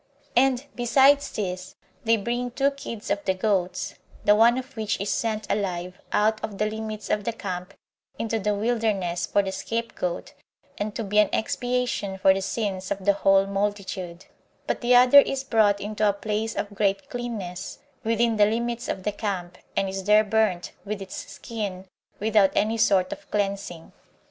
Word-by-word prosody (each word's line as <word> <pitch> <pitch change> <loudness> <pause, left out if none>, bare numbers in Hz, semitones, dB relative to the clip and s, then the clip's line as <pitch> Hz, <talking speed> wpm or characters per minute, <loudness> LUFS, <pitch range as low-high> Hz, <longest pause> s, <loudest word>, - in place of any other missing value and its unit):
And, 260 +1 +3
besides 270 +4 +4
these, 185 -2 -4 0.3
they 230 0 +4
bring 240 +4 -2
two 275 +3 +1
kids 230 -6 -7
of 200 0 0
the 190 - +1
goats; 185 -2 0 0.3
the 205 - +7
one 230 +3 +5
of 260 +2 -6
which 220 -2 -2
is 200 +1 -1
sent 220 -2 -1
alive 180 -3 -2
out 215 +1 +2
of 215 -3 -4
the 210 - +1
limits 215 0 -4
of 210 - +1
the 235 - -1
camp 185 -4 -6 0.4
into 225 0 -1
the 210 0 0
wilderness 205 -6 0
for 200 - +2
the 190 - -3
scapegoat, 225 -5 -3 0.5
and 205 0 -3
to 230 - -2
be 210 +1 +2
an 210 - +5
expiation 245 -4 -1
for 190 0 +5
the 195 - -2
sins 190 -2 -2
of 195 -1 -3
the 200 - +5
whole 195 0 +4
multitude; 195 -3 -3 0.4
but - - -2
the 245 0 +4
other 250 +3 +9
is 275 -1 +1
brought 215 -6 +3
into 210 +1 0
a - - +2
place 215 +2 -2
of 205 - -3
great 200 -1 0
cleanness, 215 -8 -5 0.3
within 230 0 +1
the 205 -1 +6
limits 235 +2 -2
of 190 - -3
the 210 - 0
camp, 185 -4 -4 0.2
and 195 - +2
is 190 0 -4
there 210 +1 +6
burnt, 210 -4 +1
with 210 0 -4
its 290 +9 -8
skin, 205 -6 -5 0.3
without 210 -2 +4
any 220 +2 +2
sort 195 -5 +3
of - - -14
cleansing. 195 -5 -3
210 Hz, 175 wpm, -25 LUFS, 195-230 Hz, 0.5 s, other